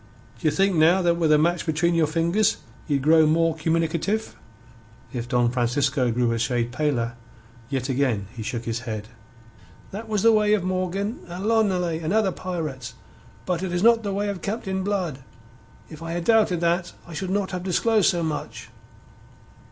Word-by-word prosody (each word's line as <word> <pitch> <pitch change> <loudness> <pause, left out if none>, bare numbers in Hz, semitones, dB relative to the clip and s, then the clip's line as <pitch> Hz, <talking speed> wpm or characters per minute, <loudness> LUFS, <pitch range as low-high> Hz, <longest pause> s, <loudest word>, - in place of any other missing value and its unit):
D'ye 160 - +2
think 195 +5 +2
now 170 +4 +4
that 170 -1 +2
with 160 -2 +2
a 150 - +6
match 170 +3 +1
between 170 +1 +1
your 165 -2 +3
fingers 170 +7 +1 0.3
ye'd 140 -3 0
grow 160 +1 +5
more 165 +1 +2
communicative?" 165 +6 -1 0.8
If 120 -1 -4
Don 120 -1 +2
Francisco 130 +1 +1
grew 120 0 +1
a 115 - -1
shade 120 0 0
paler, 120 -4 -1 0.6
yet 130 -2 -2
again 130 -7 0
he 115 - -6
shook 115 +1 -4
his 115 0 -2
head. 110 0 -5 0.8
"That 220 +3 -7
was 210 -3 0
the 230 - +7
way 210 -1 +4
of 200 - -2
Morgan 185 +4 -2
and 180 +3 -6
L'Ollonais 190 -7 +1
and 160 +4 -2
other 215 -3 +2
pirates. 160 -10 -5 0.5
But 180 -2 -1
it 190 -2 -3
is 175 +2 -1
not 230 0 +5
the 205 -2 -3
way 200 +1 -1
of 195 -3 -5
Captain 190 -2 -3
Blood. 185 -8 -2 0.7
If 155 -1 -12
I 165 0 -5
had 175 0 -2
doubted 210 -5 +3
that 175 +1 0
I 170 - -11
should 185 +4 -4
not 195 0 -1
have 180 -1 -3
disclosed 205 +3 +2
so 175 -3 0
much." 155 -2 -5
170 Hz, 180 wpm, -24 LUFS, 140-190 Hz, 0.8 s, the